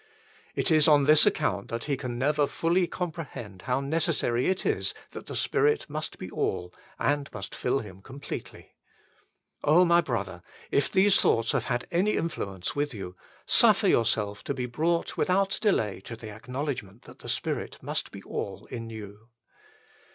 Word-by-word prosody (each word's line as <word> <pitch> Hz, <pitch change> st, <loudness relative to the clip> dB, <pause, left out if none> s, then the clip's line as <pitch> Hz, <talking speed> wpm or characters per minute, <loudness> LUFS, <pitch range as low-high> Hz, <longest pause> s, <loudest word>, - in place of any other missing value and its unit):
It -, -, +1 dB
is 155 Hz, -1 st, +6 dB
on 145 Hz, -2 st, +6 dB
this 150 Hz, +2 st, +6 dB
account -, -, 0 dB
that 115 Hz, 0 st, -4 dB
he 145 Hz, -, 0 dB
can 125 Hz, -2 st, -5 dB
never 145 Hz, +3 st, +2 dB
fully 175 Hz, +4 st, +1 dB
comprehend 155 Hz, -, -6 dB
how 125 Hz, 0 st, 0 dB
neces 160 Hz, +3 st, +1 dB
sary 120 Hz, -1 st, +1 dB
it 185 Hz, 0 st, 0 dB
is -, -, +1 dB, 0.2 s
that -, -, -9 dB
the -, -, -5 dB
Spirit 440 Hz, 0 st, +2 dB
must 155 Hz, +1 st, -5 dB
be 90 Hz, -, -7 dB
all 90 Hz, 0 st, -2 dB, 0.2 s
and 145 Hz, -1 st, 0 dB
must 100 Hz, -2 st, -7 dB
fill 135 Hz, +2 st, 0 dB
him 95 Hz, -3 st, -11 dB
completely. 135 Hz, +6 st, -8 dB, 0.9 s
my 170 Hz, +3 st, +6 dB
brother, 100 Hz, -, -3 dB, 0.3 s
if 140 Hz, -, +2 dB
these 195 Hz, +1 st, +5 dB
thoughts 115 Hz, -1 st, +3 dB
hare 135 Hz, -, +1 dB
had 120 Hz, +1 st, -2 dB
any 190 Hz, +5 st, +2 dB
influence 100 Hz, -, -3 dB
with 145 Hz, -3 st, -1 dB
you, 90 Hz, -3 st, -7 dB, 0.3 s
surfer -, -, +5 dB
yourself 105 Hz, -3 st, +1 dB
to 140 Hz, -, -2 dB
be 125 Hz, -1 st, -2 dB
brought 160 Hz, +8 st, 0 dB
without 195 Hz, +1 st, +2 dB
delay 110 Hz, -, +1 dB
to 115 Hz, -, -6 dB
the 110 Hz, -1 st, -9 dB
acknowledgment 120 Hz, -1 st, -5 dB
that -, -, -14 dB
the -, -, -8 dB
Spirit -, -, -2 dB
must -, -, -2 dB
be -, -, -10 dB
all -, -, -5 dB
in 115 Hz, -2 st, -5 dB
you. 110 Hz, 0 st, -10 dB
135 Hz, 165 wpm, -28 LUFS, 110-165 Hz, 0.9 s, is